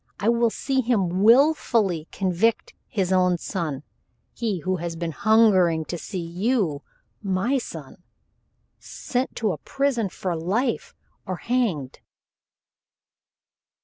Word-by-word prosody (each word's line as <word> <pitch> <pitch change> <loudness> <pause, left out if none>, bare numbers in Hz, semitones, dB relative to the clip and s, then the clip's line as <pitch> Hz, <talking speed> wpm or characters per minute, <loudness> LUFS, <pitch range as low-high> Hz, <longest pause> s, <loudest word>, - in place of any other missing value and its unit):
I 210 +2 +1
will 235 0 +3
see 265 +3 -1
him 195 -7 0
willfully 225 - +3
convict 195 +4 0
his 190 -3 -1
own 180 -1 +3
son 155 -6 -4 0.5
he 215 -7 -2
who 185 +2 -1
has 170 0 -4
been 165 0 -3
hungering 185 -5 +3
to 175 - -4
see 190 +2 -5
you 180 - 0 0.4
my 200 +7 0
son - - -9 0.8
sent 255 +1 -3
to 215 -3 0
a 155 - -5
prison 270 - -1
for 180 0 -3
life 235 - -1 0.3
or 185 - -2
hanged." 195 - -1
195 Hz, 115 wpm, -24 LUFS, 175-235 Hz, 0.8 s, will